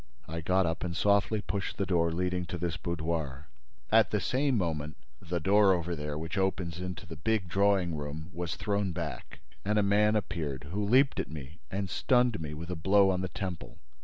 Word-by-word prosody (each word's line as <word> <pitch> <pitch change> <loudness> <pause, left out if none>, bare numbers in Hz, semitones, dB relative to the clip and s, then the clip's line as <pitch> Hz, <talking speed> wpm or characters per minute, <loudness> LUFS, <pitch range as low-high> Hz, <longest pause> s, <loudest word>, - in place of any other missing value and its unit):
I 80 +1 -4
got 95 +3 +2
up 80 0 -2
and 85 -2 -2
softly 100 +1 +3
pushed 100 +1 -3
the 100 - 0
door 85 -2 +2
leading 90 +1 -1
to 90 - -4
this 85 -1 -2
boudoir. 80 -4 -3 0.4
At 110 0 +6
the 105 - +1
same 135 +3 +1
moment, 75 -6 -2 0.2
the 85 +1 -2
door 100 +3 +5
over 85 -1 -1
there, 75 -1 -4
which 80 +5 -3
opens 90 -3 -1
into 90 -1 -5
the 85 -1 -8
big 100 +4 0
drawing 95 -2 +2
room, 75 +3 -6
was 85 -1 -3
thrown 100 -3 -1
back - - -6 0.2
and 105 +2 +1
a 105 - +4
man 105 +2 +4
appeared 75 -9 -3
who 105 +3 -1
leaped 130 +7 +4
at - - -2
me 75 0 -9
and 100 0 -2
stunned 125 +2 +2
me 75 -1 -5
with 85 +3 -6
a - - -2
blow 95 +4 +4
on 90 -1 -1
the 95 - -1
temple. 90 -4 -5
90 Hz, 200 wpm, -30 LUFS, 80-100 Hz, 0.4 s, At